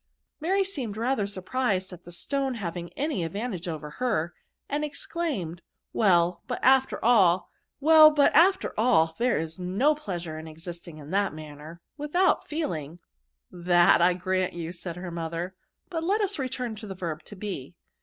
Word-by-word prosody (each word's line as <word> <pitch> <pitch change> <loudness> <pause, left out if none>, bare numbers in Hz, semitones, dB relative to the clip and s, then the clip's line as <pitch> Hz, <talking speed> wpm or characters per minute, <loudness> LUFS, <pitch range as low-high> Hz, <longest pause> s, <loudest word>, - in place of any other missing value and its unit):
Mary 380 +5 +2
seemed 265 - -5
rather 230 -3 0
surprised 195 -1 -2
at 175 0 -12
the 175 - -10
stone 270 +8 -1
having 175 -4 -5
any 285 - -1
advantage 195 0 -4
over 155 -3 -5
her, 215 -7 -1 0.3
and 290 +1 -1
ex 290 -1 -5
claimed, 240 - -3 0.2
" - - -57
Well, 175 -4 +3
but - - -2
after 265 0 +4
all, 190 -7 +4 1.7
there 245 0 +2
is 160 +3 -4
no 195 +12 +2
pleasure 175 - -5
in 160 - -9
existing 165 +1 -9
in 150 +1 -10
that 195 -3 +1
manner, 155 +2 -10 0.2
without 310 +6 +1
feeling.'* 170 - -3 0.4
" - - -50 0.2
That 175 -1 +6
I 175 +1 +4
grant 185 0 -1
you," 170 -1 -5
said 175 -1 -6
her 180 0 -6
mother; 170 +2 -4 0.2
" - - -48
but 325 -2 -2
let 400 +5 +1
lis 405 -5 0
return 250 -3 -3
to 215 0 -8
the 190 - -6
verb 165 -4 -4
to 205 - -10
be. 185 -7 -6
185 Hz, 165 wpm, -27 LUFS, 170-255 Hz, 1.7 s, That